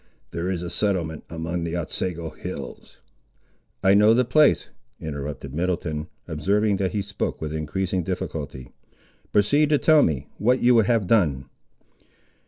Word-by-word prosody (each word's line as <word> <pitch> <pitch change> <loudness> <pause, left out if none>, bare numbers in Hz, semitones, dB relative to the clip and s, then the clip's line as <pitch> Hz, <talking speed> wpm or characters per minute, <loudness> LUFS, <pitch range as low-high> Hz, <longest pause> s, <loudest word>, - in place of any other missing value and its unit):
There 85 +2 -3
is 90 -2 -2
a 90 - -4
settlement 85 -7 -1
among 85 +1 -3
the 85 +1 -2
Otsego 85 0 -3
hills—" - - -8 0.9
"I 95 - +5
know 105 +2 +6
the 125 +1 +3
place," 150 +4 +4 0.3
interrupted 70 -2 -6
Middleton, 80 -2 -2 0.2
observing 100 +6 +1
that 95 -1 -1
he 105 -2 -1
spoke 100 0 -3
with 75 -1 -4
increasing 90 +4 -2
difficulty; 75 -7 -5 0.6
"proceed 145 +9 +3
to 150 - +4
tell 155 +1 +5
me, 70 - 0
what 125 +4 +3
you 125 +1 +5
would 110 -3 +4
have 115 -5 +2
done." 80 - +2
90 Hz, 145 wpm, -24 LUFS, 80-105 Hz, 0.9 s, know